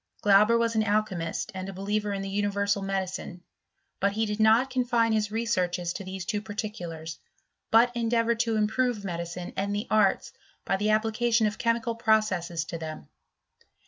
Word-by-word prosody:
Glauber 210 +3 +5
was 230 0 +1
an 220 - +2
alchymist 210 -3 -1
and 190 0 -5
a - - -6
believer 205 +2 -2
in 195 -1 -3
the 195 - -4
universal 200 0 0
medicine. 190 -2 -4 0.6
But 200 +1 +1
he 220 +2 0
did 210 0 -3
not 225 +5 +4
confine 240 -3 +2
his 215 -1 +1
researches 180 -6 -1
to 200 - -6
these 190 -1 -6
two 210 +2 -2
particulars, 175 -7 -6 0.5
but 235 +2 +5
en 235 -2 -1
deavoured 230 0 +1
to 230 -1 +1
improve 220 0 0
medicine 175 0 -5
and 200 +1 -1
the 205 - -2
arts 215 0 +2 0.3
by - - +1
the 210 +2 0
application 225 +1 +2
of 210 +2 -2
chemical 230 -2 0
processes 210 -8 +1
to 165 0 -6
them. 155 - -7
210 Hz, 170 wpm, -27 LUFS, 190-225 Hz, 0.6 s, Glauber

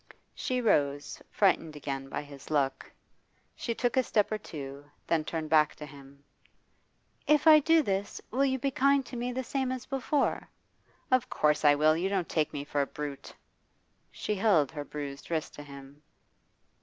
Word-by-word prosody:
She 255 -1 -2
rose, 145 -9 +1
frightened 165 -6 +2
again 135 -2 -5
by - - -4
his 140 -2 -12
look. 140 -3 -1 0.6
She 230 - -3
took 245 0 0
a 260 - +5
step 215 -4 +1
or 215 - -1
two, 140 -6 -8 0.2
then 165 -2 +1
turned 155 -1 -4
back 155 -1 +4
to 150 - -8
him. 140 -1 -15 1.0
'If 300 +1 +4
I 310 -1 +9
do 320 +2 +4
this, 200 -3 -2
will 260 +5 +1
you 265 -1 +1
be 275 +2 -1
kind 275 0 +3
to 250 - -9
me, 245 +1 -2
the 260 +1 -3
same 260 +1 -2
as 255 -1 -5
before?' 270 +2 -1 0.6
'Of 255 -2 +3
course 150 0 +1
I 145 -1 +6
will. 155 +2 +4
You 180 +4 -1
don't 190 -4 -1
take 155 -2 0
me 140 - -4
for 145 0 -1
a 140 - -1
brute?' 145 -2 -7 0.7
She 210 - -3
held 190 -9 +3
her 150 -2 -5
bruised 145 -1 -7
wrist 160 -2 -2
to - - -9
him. 140 0 -12
160 Hz, 180 wpm, -29 LUFS, -, 1.0 s, I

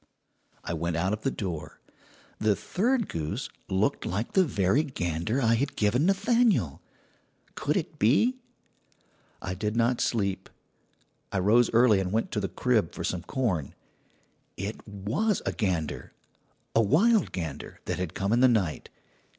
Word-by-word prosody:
"I - - -3
went 85 +1 -2
out 95 +5 0
of 110 - -3
the 135 - +1
door. 90 - -5 0.6
"The 110 -1 +3
third 230 - 0
goose 80 -2 -4 0.2
looked 100 +8 +1
like 100 +6 -2
the 190 - +5
very 105 - +2
gander 100 - -2
I 115 -3 +3
had 135 +5 0
given 120 - +2
Nathaniel. 195 - +2 0.7
Could - - -1
it - - -4
be? 190 - +3 1.1
"I 90 - -3
did 105 +3 -2
not 120 +1 +2
sleep. 100 -4 -1 0.8
I - - -1
rose 110 +6 +4
early 115 -3 +5
and 95 -1 -2
went 110 +2 0
to 105 - -1
the 100 - -2
crib 110 -9 +1
for - - -5
some 90 - -2
corn. 90 - -2 0.8
"It 100 +4 -6
was 110 - -1
a - - 0
gander 90 -8 -2 0.6
a 115 - +6
'wild 195 - +3
gander' 80 -6 -6
that - - -2
had 90 -3 -4
come 100 +2 0
in 120 - +3
the 130 - +7
night. 100 -10 0
110 Hz, 150 wpm, -27 LUFS, 95-130 Hz, 1.1 s, the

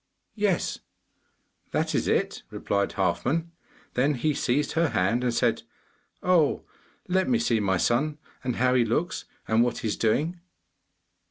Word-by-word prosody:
'Yes, 205 -5 0 0.9
that - - 0
is - - 0
it,' - - 0
replied 100 0 -1
Halfman. 130 - 0 0.4
Then 140 +4 +2
he 150 +5 0
seized 135 +2 0
her 165 -1 +2
hand 115 +7 +1
and 125 - +1
said, 115 - +1 0.6
'Oh, 175 -5 +3 0.4
let 185 +1 +1
me 245 - +4
see 120 - +1
my 95 -3 +1
son, 145 +10 +1 0.3
and 125 -2 -1
how 125 +1 +2
he 125 -2 +4
looks, 135 +10 -1 0.2
and 110 +1 +3
what 120 0 +1
he - - -3
is - - -2
doing. 155 +11 +1
130 Hz, 150 wpm, -26 LUFS, 115-165 Hz, 0.9 s, me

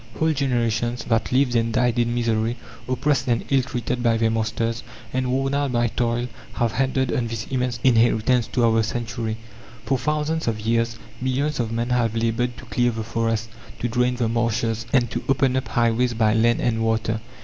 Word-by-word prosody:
Whole 160 0 +2
generations, 120 -4 0
that 115 -1 0
lived 130 -1 +2
and 115 0 +2
died 120 +1 +1
in 120 0 +1
misery, 115 0 0 0.3
oppressed 135 +3 0
and 120 -2 +1
ill 135 -1 +5
treated 125 -1 -3
by 115 -1 +3
their 115 0 +2
masters, 115 +1 -1 0.3
and 130 0 0
worn 135 +2 0
out 140 -2 0
by 120 0 +2
toil, 120 +1 -1 0.3
have 120 -2 0
handed 130 +1 0
on 120 -2 0
this 115 0 -4
immense 125 -2 -1
inheritance 120 -1 +3
to 120 -2 +1
our 115 -1 +3
century. 110 0 -3 0.5
For 135 -2 +1
thousands 150 +3 -1
of 110 -2 0
years 115 +1 0 0.2
millions 135 +3 0
of 115 -2 -1
men 120 +2 -2
have 115 -2 +1
laboured 115 +2 0
to - - -10
clear 120 +2 +1
the 115 -1 -3
forests, 115 0 -1 0.3
to 120 - -2
drain 125 +1 +1
the 120 -2 0
marshes, 115 -1 -1
and 125 -3 +3
to - - -3
open 135 -1 +2
up 130 - -1
highways 120 +1 +1
by 110 -1 +3
land 115 +1 +3
and 115 -2 0
water. 110 0 0
120 Hz, 190 wpm, -23 LUFS, 115-125 Hz, 0.5 s, ill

